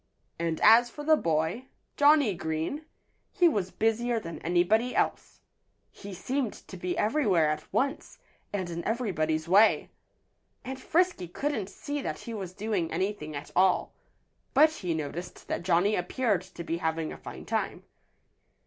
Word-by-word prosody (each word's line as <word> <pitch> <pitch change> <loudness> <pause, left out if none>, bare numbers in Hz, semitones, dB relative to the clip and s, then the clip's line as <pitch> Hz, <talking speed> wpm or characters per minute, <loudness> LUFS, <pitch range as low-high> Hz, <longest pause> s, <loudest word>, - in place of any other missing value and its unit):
And 165 -1 -1
as 240 +2 +7
for 295 +5 -8
the 315 +1 +5
boy, 165 - -1 0.3
Johnnie 290 -6 +5
Green, 160 - -3 0.5
he 360 -4 +4
was 205 - 0
busier 225 +3 0
than 165 -5 -7
anybody 190 +9 +2
else. - - -1 0.5
He 200 - -10
seemed 250 +5 -2
to - - -12
be 180 0 -3
everywhere 210 - +2
at 155 0 -6
once, 275 +1 -1 0.3
and 190 -3 -2
in 170 0 -4
everybody's 165 -9 -1
way. 205 +5 +4 0.7
And 265 0 -6
Frisky 350 - +1
couldn't 220 - -3
see 290 0 -5
that - - -3
he 235 - -7
was 190 -4 -5
doing 205 -5 -1
anything 170 -4 -2
at 145 +1 -7
all. 185 +1 +3 0.6
But 310 +3 +7
he 180 - -3
noticed 160 +3 -6
that - - -1
Johnnie 180 +4 +2
appeared 200 +2 0
to 185 -2 -9
be 165 0 -2
having 160 -1 -2
a - - -9
fine - - -9
time. - - -2
195 Hz, 150 wpm, -28 LUFS, 170-245 Hz, 0.7 s, as